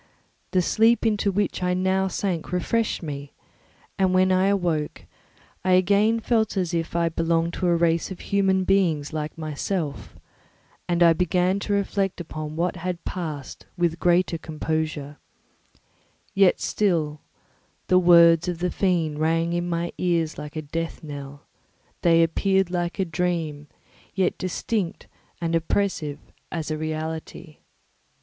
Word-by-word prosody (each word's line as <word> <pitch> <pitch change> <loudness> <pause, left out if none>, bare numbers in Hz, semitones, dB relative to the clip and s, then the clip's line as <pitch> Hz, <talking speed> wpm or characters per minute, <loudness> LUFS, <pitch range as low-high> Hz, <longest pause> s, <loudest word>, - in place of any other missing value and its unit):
The 185 -2 +2
sleep 225 +5 +3
into 210 -2 +2
which 200 -1 -1
I 180 0 +1
now 190 +1 +1
sank 180 -3 -3
refreshed 210 +4 0
me; 140 -2 -6 0.7
and 185 -1 +3
when 185 0 +4
I 185 +1 +3
awoke, 175 -6 -1 0.6
I 185 0 +3
again 200 +5 +3
felt 220 -2 0
as 180 -2 -1
if 165 0 -2
I 170 0 +2
belonged 165 +1 0
to 180 - -1
a 170 - +4
race 165 0 +1
of 190 - -7
human 190 -1 +1
beings 170 -7 +1
like 155 0 -4
myself, 155 0 -4 0.7
and 175 0 +3
I 170 -1 +7
began 180 +2 +1
to 205 - -2
reflect 200 -1 0
upon 155 -2 -6
what 175 +2 -1
had 180 0 -4
passed 155 -7 -6
with 170 -1 0
greater 175 -1 +2
composure; 155 -2 -3 1.2
yet 195 -2 +4
still 160 -7 0 0.6
the 185 - +4
words 170 -1 +6
of 175 -1 -2
the 180 +1 -1
fiend 165 -6 0
rang 165 +2 +1
in 175 0 -1
my 170 0 -1
ears 170 -3 0
like 150 0 -8
a 155 - -3
death 165 +3 -4
knell; 145 -1 -8 0.6
they 165 -1 +5
appeared 190 +2 +1
like 175 0 -2
a 190 - +1
dream, 165 -3 -2 0.5
yet 185 -2 +1
distinct 185 0 -3 0.3
and 170 -1 -2
oppressive 165 -3 0 0.3
as 160 -2 -3
a 155 - -1
reality. 155 0 -5
170 Hz, 140 wpm, -24 LUFS, 160-185 Hz, 1.2 s, I